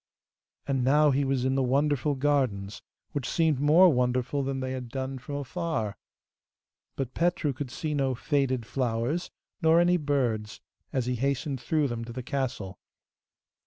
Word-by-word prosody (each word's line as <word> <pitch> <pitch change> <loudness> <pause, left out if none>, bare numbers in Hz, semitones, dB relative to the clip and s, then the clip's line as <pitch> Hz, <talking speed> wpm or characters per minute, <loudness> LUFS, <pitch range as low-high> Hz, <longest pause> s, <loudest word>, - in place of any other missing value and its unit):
And 135 -2 0
now 145 +3 +5
he 140 +1 +2
was 135 -2 0
in 130 - +2
the 135 - +2
wonderful 140 +2 +1
gardens, 130 -8 0 0.3
which 145 -4 -3
seemed 160 -5 +2
more 160 +4 +6
wonderful 125 +2 0
still - - -2
than 135 0 -2
they 130 0 -3
had 130 -2 -5
done 130 +1 -4
from 140 +3 -6
afar. 145 - -2 1.0
But 130 -2 -3
Petru 165 -4 +1
could 130 0 -5
see 150 +5 -3
no 135 -3 +1
faded 130 -3 0
flowers, 125 +7 -1 0.3
nor 160 0 +5
any 175 +1 +4
birds, 125 -8 -1 0.3
as 130 -3 0
he 125 0 -1
hastened 135 0 -1
through 155 -3 +1
them 120 -2 -4
to 120 - -8
the 125 +1 -5
castle. 120 -9 -3
135 Hz, 160 wpm, -28 LUFS, 125-145 Hz, 1.0 s, more